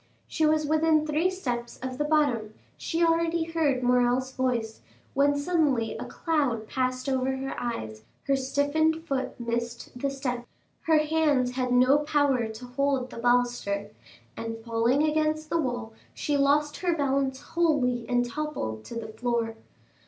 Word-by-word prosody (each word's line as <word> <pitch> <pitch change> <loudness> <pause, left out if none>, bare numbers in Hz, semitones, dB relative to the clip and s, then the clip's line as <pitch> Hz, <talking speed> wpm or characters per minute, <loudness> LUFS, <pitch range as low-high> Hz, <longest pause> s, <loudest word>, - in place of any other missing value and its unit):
She 315 -2 +1
was 310 0 +2
within 310 0 +3
three 310 +4 +1
steps 245 -11 -4
of 260 0 -4
the - - +2
bottom; 275 -8 +1 0.2
she 335 0 -1
already 330 0 +2
heard 315 -6 0
Morrel's 250 +1 +2
voice, 245 -4 -2 0.3
when 285 +1 +3
suddenly 285 -7 +1
a - - -5
cloud 275 -10 -1
passed 255 +1 -1
over 265 0 0
her 270 +1 -4
eyes, 110 - -4 0.2
her 275 - +2
stiffened 290 +4 +1
foot 270 -5 -3
missed 235 0 -3
the 275 +3 -1
step, 250 -3 -4 0.4
her 320 -1 +5
hands 300 -5 +2
had 250 0 -2
no 255 +3 +5
power 285 -5 +1
to 220 +3 -8
hold 260 0 -1
the - - -9
baluster, 240 -4 +1 0.4
and 225 0 -5
falling 235 +5 +2
against 310 0 0
the 335 - +2
wall 245 -4 -3 0.2
she 295 - -1
lost 290 +1 +2
her 350 -2 0
balance 270 -2 0
wholly 280 -7 0
and 245 0 +2
toppled 240 - -4
to 235 - -8
the 225 -1 -5
floor. 230 0 -1
265 Hz, 150 wpm, -27 LUFS, 245-305 Hz, 0.4 s, her